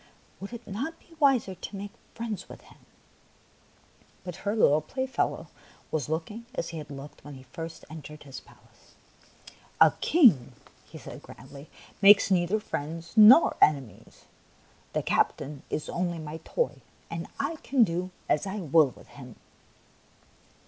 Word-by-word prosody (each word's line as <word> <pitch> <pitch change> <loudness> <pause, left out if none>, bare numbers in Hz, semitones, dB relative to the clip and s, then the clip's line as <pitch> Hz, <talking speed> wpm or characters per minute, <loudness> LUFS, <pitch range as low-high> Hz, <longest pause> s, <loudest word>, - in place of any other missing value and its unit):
Would 195 - -8
it 235 -1 -9
not 255 +12 -5
be - - -27
wiser 270 - +3
to 185 +3 -8
make 200 +1 -6 0.2
friends 225 -3 -5
with - - -11
him? - - -19 0.7
" - - -32
But 180 -2 -7
her 205 +1 -2
little 155 -8 +4
playfellow 260 - -2 0.5
was 150 -3 -2
looking 210 +9 -4
as 170 - -3
he 165 - -6
had 150 -1 -9
looked 140 0 -10
when 145 0 -10
he 130 - -12
first 165 +6 -8
entered 150 -1 -10
his 135 -2 -9
palace. - - -23 0.4
'' - - -21
A - - -12
king," 190 - +5 0.4
he - - -10
said - - -10
grandly, 140 +1 -13 0.2
" - - -25
makes 200 0 +7
neither 185 +3 +2
friends 165 -3 -6
nor 220 +8 +8
enemies. 140 -7 0 0.7
The - - -1
captain 140 0 0
is 150 - -3
only 175 -1 -2
my 155 0 -6
toy, 485 - -2 0.3
and 170 0 -5
I 290 +4 -2
can 270 -4 +2
do 180 -1 -1 0.2
as 150 - +1
I 190 - -4
will 160 -4 +4
with - - -17
him." 125 -4 -12
170 Hz, 155 wpm, -28 LUFS, 150-215 Hz, 0.7 s, nor